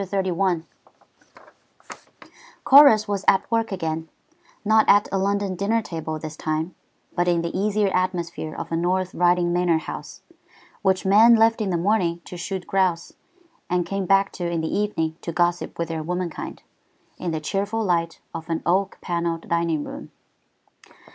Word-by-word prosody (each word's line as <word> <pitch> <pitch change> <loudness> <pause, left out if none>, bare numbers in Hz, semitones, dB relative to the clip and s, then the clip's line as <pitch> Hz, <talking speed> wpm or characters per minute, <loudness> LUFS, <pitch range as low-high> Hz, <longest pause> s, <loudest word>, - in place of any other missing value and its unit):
CHAPTER 190 -1 -1
XXXI 175 -2 0 2.0
Chorus 265 -6 +7
was 200 -1 -2
at 195 0 +4
work 225 -1 +1
again; 160 -3 -3 0.6
not 220 +1 +4
at 205 +1 +5
a 195 - 0
London 200 0 0
dinner 215 +5 0
table 160 -4 -5
this 155 0 -7
time, 155 +3 -3 0.4
but 175 0 +1
in 170 -1 +2
the 170 - -4
easier 205 +1 +1
atmosphere 175 -4 -2
of - - -6
a - - 0
North 185 +2 0
Riding 175 0 +2
manor 175 -2 +2
house, 160 - -8 0.6
which 190 -2 +1
men 220 +5 +7
left 225 0 +3
in 205 - -1
the 175 - 0
morning 175 -2 +1
to - - -9
shoot 180 +1 -5
grouse, 185 -3 0 0.6
and 180 -1 +1
came 195 +1 -3
back 195 +1 +3
to 175 -2 -4
in 170 -1 -1
the 160 - -2
evening 165 -6 -1
to 170 - -4
gossip 175 +1 0
with 170 -1 -3
their 160 -1 -3
womenkind, 175 +1 -5 0.6
in 180 - -3
the 160 -1 -2
cheerful 200 +8 -2
light 170 -3 0
of 165 0 -7
an 165 -1 -2
oak 190 +3 +1
panelled 170 -1 -2
dining 170 -3 0
room. - - -8
180 Hz, 160 wpm, -23 LUFS, 170-195 Hz, 2.0 s, Chorus